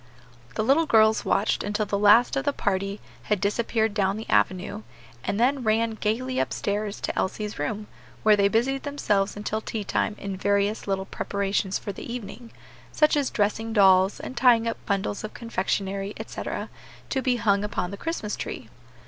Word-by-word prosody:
The 215 - 0
little 290 +8 +3
girls 220 -2 +4
watched 210 - +1
until 210 +1 -1
the 205 - -2
last 210 +6 +6
of 275 - 0
the 285 0 0
party 200 -2 -1 0.3
had 210 -2 +1
disappeared 220 +2 0
down 195 -1 +1
the 220 - -7
avenue, 185 - +1 0.4
and 200 - -2
then 265 +3 +2
ran 225 +1 +2
gayly 235 +4 -1
up - - -2
stairs 205 0 -2
to - - -2
Elsie's 210 -1 -2
room, 205 +9 -2 0.4
where 215 -1 +6
they 200 -1 +4
busied 250 +6 +1
themselves 205 -9 0
until 215 +1 -2
tea 220 -1 -4
time 210 +2 -1
in 200 -1 -5
various 200 +2 0
little 195 -1 -1
preparations 195 -1 -1
for 200 - -5
the 200 - -8
evening, 235 0 -7 0.4
such 305 0 +3
as 285 -3 +1
dressing 220 +2 -1
dolls, 190 -2 +5
and 260 - -7
tying 240 -2 +4
up 230 - -4
bundles 200 0 -1
of 215 - -7
confectionery, 200 -3 -2
etc., - - -5 0.4
to 265 - +1
be 255 -2 +1
hung 205 -4 +2
upon 200 -3 -2
the - - -4
Christmas 215 -3 -3
tree. - - -6
210 Hz, 175 wpm, -25 LUFS, 200-230 Hz, 0.4 s, last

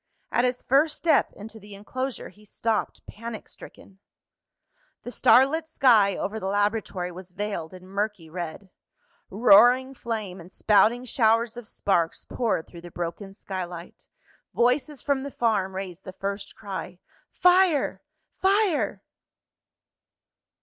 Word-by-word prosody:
At 240 - +2
his 250 0 -2
first 300 +4 +2
step 330 - +2
into 220 +2 -11
the 205 0 -12
enclosure 255 +6 -5
he 210 - -20
stopped 220 +1 -2
panic 230 +1 -8
stricken. 195 -1 -15 1.0
The 245 - -7
starlit 280 +7 +4
sky 220 -10 +4
over 215 +3 -3
the 190 - -4
laboratory 205 -3 -1
was 180 +1 -10
veiled 185 -4 -4
in 185 0 -12
murky 200 -3 -3
red. 175 +3 -7 0.6
Roaring 245 +5 +5
flame, 215 -7 -5
and 175 +2 -14
spouting 225 +5 +3
showers 230 -1 +2
of 240 -2 -9
sparks, 170 -7 -1
poured 225 -9 -1
through 170 - -13
the 175 - -10
broken 175 +4 -5
skylight. 180 -3 -8 0.5
Voices 255 +4 +1
from 280 -2 0
the 280 - -5
farm 205 -7 0
raised 190 -1 -6
the 185 - -9
first 200 +1 -5
cry 190 -3 -7 0.3
"Fire! 360 -5 +3 0.4
fire!" 390 -4 +1
210 Hz, 130 wpm, -25 LUFS, 190-250 Hz, 1.0 s, Roaring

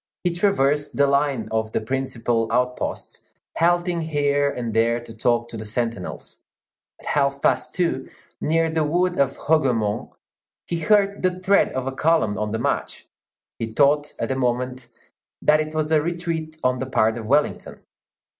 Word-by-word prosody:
He 175 -1 +1
traversed 150 -6 +1
the 140 - +5
line 140 -3 +1
of 110 0 -1
the - - +1
principal 115 -2 -1
outposts, 125 +1 -2 0.3
halting 175 0 +2
here 145 -2 +1
and 120 -5 -4
there 115 +2 +2
to 120 -1 -11
talk 120 +1 +1
to 115 - -7
the 110 - -6
sentinels. 115 -2 -4 0.6
At - - -16
half 140 -1 +1
past - - 0
two, 170 -7 -1 0.3
near 165 +1 +2
the 160 -1 +1
wood 175 +4 0
of 140 -1 +1
Hougomont, 125 -9 +1 0.6
he 170 - -3
heard 200 +3 +2
the 185 0 0
tread 195 +2 +3
of 130 -1 -2
a 135 - -2
column 135 -8 +1
on 105 0 -1
the 110 - -2
march; 115 - -2 0.5
he 115 -1 -4
thought 145 +3 +2
at - - -3
the 130 - 0
moment 125 0 -2 0.6
that 155 0 +5
it 155 0 -3
was 155 0 0
a 155 -1 +4
retreat 165 -1 -3
on 125 0 +1
the 130 - -3
part 110 -4 +2
of 115 -2 -6
Wellington. 145 +4 0
140 Hz, 165 wpm, -23 LUFS, 120-160 Hz, 0.6 s, the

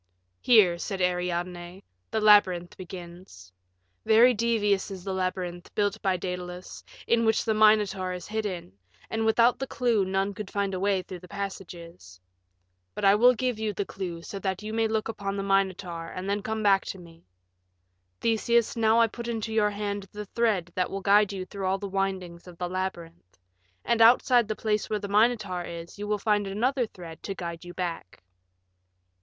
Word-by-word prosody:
"Here," 195 -8 +5
said 195 +1 -4
Ariadne, 180 0 -2 0.3
"the 220 - -1
labyrinth 190 -5 +4
begins. 175 - -11 0.5
Very 235 +3 +6
devious 210 -4 +1
is 190 -2 -8
the 195 0 -3
labyrinth, 185 -1 -3
built 205 +1 0
by 190 -2 +1
Daedalus, 180 0 -6 0.2
in 230 0 +2
which 220 -1 +2
the 220 - +2
Minotaur 210 -3 +3
is 180 -1 -6
hidden, 205 - -4 0.4
and 225 0 0
without 230 +2 +4
the 270 - -3
clue 235 -6 +1
none 195 +1 -1
could 200 0 -7
find 200 -1 -1
a 185 - -2
way 195 -1 +1
through 180 -1 -8
the 180 - -14
passages. 175 - -8 0.8
But - - -2
I 195 - +7
will 245 +4 +5
give 250 -1 -1
you 215 -1 -1
the 200 - -2
clue 175 -4 -6
so 195 - -6
that 190 0 -3
you 215 +1 -5
may 225 0 +2
look 220 -1 -1
upon 200 -3 -4
the 195 - -2
Minotaur 190 -4 0
and 185 +3 -6
then 200 +1 0
come 220 +1 -3
back 195 -2 +4
to - - -5
me. 170 -2 -15 1.0
Theseus, 230 0 +2
now 225 0 +3
I 230 - +6
put 235 +2 -7
into 225 -1 -3
your 210 -1 +3
hand 205 -1 -4
the 210 0 -7
thread 205 -5 0
that 180 - 0
will 195 - -4
guide 205 +1 +4
you 190 -2 -5
through 195 0 -5
all 190 +1 +1
the 200 +1 -5
windings 185 -3 -3
of 175 -1 -12
the 180 - -3
labyrinth. 170 - -6 0.5
And 230 -1 +2
outside 240 0 +6
the 215 - -2
place 215 -1 -1
where 215 - 0
the 205 -1 -5
Minotaur 210 -3 +2
is 170 +2 -8
you 205 - -4
will 210 0 +1
find 205 -1 +1
another 240 +5 0
thread 170 -6 -11
to 195 - -5
guide 170 -2 -6
you 175 0 -10
back." 170 - -5
195 Hz, 185 wpm, -27 LUFS, 180-215 Hz, 1.0 s, I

